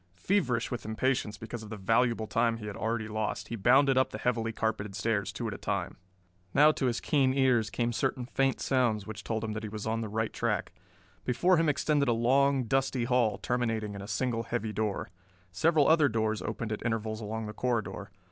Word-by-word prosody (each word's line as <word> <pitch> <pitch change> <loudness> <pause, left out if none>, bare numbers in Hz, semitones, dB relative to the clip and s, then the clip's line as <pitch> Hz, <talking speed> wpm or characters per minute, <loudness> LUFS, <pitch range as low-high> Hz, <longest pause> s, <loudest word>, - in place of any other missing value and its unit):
Feverish 125 - 0
with 125 - -4
impatience 110 -1 -1
because 115 +2 -7
of 110 - -10
the 110 - -6
valuable 115 +3 +2
time 115 +1 +1
he 110 - -8
had 105 -1 -5
already 110 -1 -2
lost, 110 0 -3
he 115 - -3
bounded 130 +5 +4
up 130 - +2
the - - -6
heavily 115 0 0
carpeted 110 -3 -2
stairs 105 -1 -1
two - - -4
at - - -3
a - - -8
time. - - -2 0.6
Now 150 +1 +7
to 135 -3 -1
his 120 -1 0
keen 135 -3 +2
ears 125 -5 +3
came 120 0 -1
certain 125 +1 -1
faint 135 +1 0
sounds 120 -6 +1
which 110 -1 -7
told 110 -1 -2
him 110 - -2
that 110 - -4
he 110 - -5
was 105 0 -6
on 115 +1 -1
the 110 - -4
right 110 +1 -2
track. - - -1 0.5
Before 175 +9 +3
him 165 -1 +3
extended 145 0 +1
a 120 - +3
long, 135 +3 +3
dusty 135 +1 0
hall, 120 -3 +2
terminating 115 -4 -1
in 100 - -7
a 100 - -8
single 115 +2 -1
heavy 115 -2 -3
door. 105 -3 -2 0.4
Several 155 - +3
other 155 -3 +5
doors 110 -1 0
opened 115 -2 -4
at 105 - -4
intervals 110 -1 -2
along 110 +1 -4
the 105 - -6
corridor. 110 -4 -2
115 Hz, 210 wpm, -29 LUFS, 110-130 Hz, 0.6 s, Now